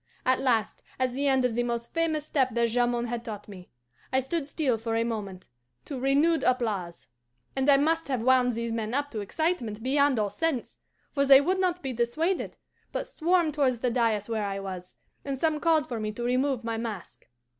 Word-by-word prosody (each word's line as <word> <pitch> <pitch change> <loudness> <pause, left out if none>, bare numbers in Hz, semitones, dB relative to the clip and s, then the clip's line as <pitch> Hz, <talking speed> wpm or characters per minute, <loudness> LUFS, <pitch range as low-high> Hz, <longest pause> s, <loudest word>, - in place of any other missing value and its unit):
At 255 0 +3
last, 230 -5 +1 0.2
at 255 -1 0
the 280 +3 -1
end 265 -2 +3
of 245 - +1
the 240 - +1
most 235 -1 -3
famous 320 -2 0
step 260 -6 0
that 235 0 +2
Jamond 240 0 +1
had 235 -1 -3
taught 210 -3 -7
me, 185 -3 -11 0.4
I 260 - +3
stood 275 +3 -2
still 285 -5 0
for 225 0 -2
a 230 - +2
moment 205 -5 -5 0.4
to 275 -3 -5
renewed 285 +5 +3
applause; 210 -9 -1 0.5
and 270 +1 +1
I 280 - +7
must 325 +3 +1
have 255 -5 -1
wound 255 -1 +4
these 235 0 -3
men 225 +1 -2
up 285 0 -1
to 220 - -4
excitement 230 - -2
beyond 280 0 +3
all 210 -2 0
sense, 305 +2 -2 0.3
for 280 - +2
they 270 -1 +9
would 365 +7 0
not 360 -2 0
be 265 -1 -3
dissuaded, 305 +11 -1 0.3
but - - -3
swarmed 340 -1 +1
towards 270 -4 +2
the 250 - +1
dais 225 -4 +1
where 220 -2 -1
I 195 0 -3
was, 185 -2 -7 0.3
and 275 -1 -3
some 310 +2 +1
called 315 -4 +2
for 235 -3 -4
me 215 0 -2
to 240 - -5
remove 255 0 +1
my 230 -1 -2
mask. 220 -6 -6
250 Hz, 205 wpm, -27 LUFS, 225-285 Hz, 0.5 s, they